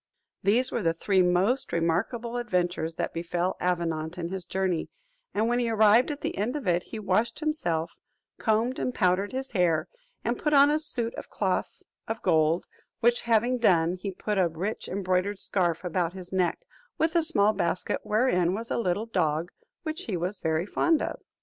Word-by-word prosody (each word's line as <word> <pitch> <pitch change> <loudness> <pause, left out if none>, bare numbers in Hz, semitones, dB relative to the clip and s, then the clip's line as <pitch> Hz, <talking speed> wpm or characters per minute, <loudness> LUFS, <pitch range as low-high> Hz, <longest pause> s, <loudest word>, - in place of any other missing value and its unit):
These 240 +6 +2
were - - -1
the 165 -3 +1
three 190 +2 +2
most 185 +9 +2
remarkable 220 +9 -1
adventures 175 -7 -1
that - - -3
befell 175 +2 -1
Avenant 165 -2 -1
in 170 -1 -3
his 190 -1 -5
journey; 185 -2 -1 0.4
and 220 +2 +1
when 240 +1 +1
he 240 -1 0
arrived 220 +3 +5
at 295 -1 -4
the - - -3
end 225 +6 -1
of 290 -5 -4
it, 175 -1 +2
he 225 - -7
washed 215 +2 0
himself, 175 - -2 0.4
combed 230 +3 +1
and 250 - -2
powdered 185 +1 +2
his 265 +1 -4
hair, 175 -5 +2 0.4
and - - -1
put 300 -2 0
on 285 +1 +7
a 305 - +2
suit 240 -7 -2
of - - -8
cloth 190 -3 -2 0.2
of 225 0 -3
gold: 160 -1 +3 0.3
which 240 +1 +3
having 235 +2 +2
done, 175 -6 +3
he 185 +2 -5
put 200 +2 -2
a 180 - +4
rich 175 +6 -4
embroidered 185 +1 0
scarf 175 -4 0
about 175 -1 -1
his 185 -1 -9
neck, 185 - +1 0.4
with 320 +1 +1
a 340 - +5
small 215 -11 +3
basket, 180 -3 -1
wherein 190 -6 +2
was 230 +2 -6
a - - 0
little 200 0 0
dog 170 -5 0 0.3
which 320 +3 -4
he 195 -5 -2
was 180 +3 -3
very 160 +1 0
fond 320 +9 +2
of. - - -4
195 Hz, 185 wpm, -27 LUFS, 175-235 Hz, 0.4 s, on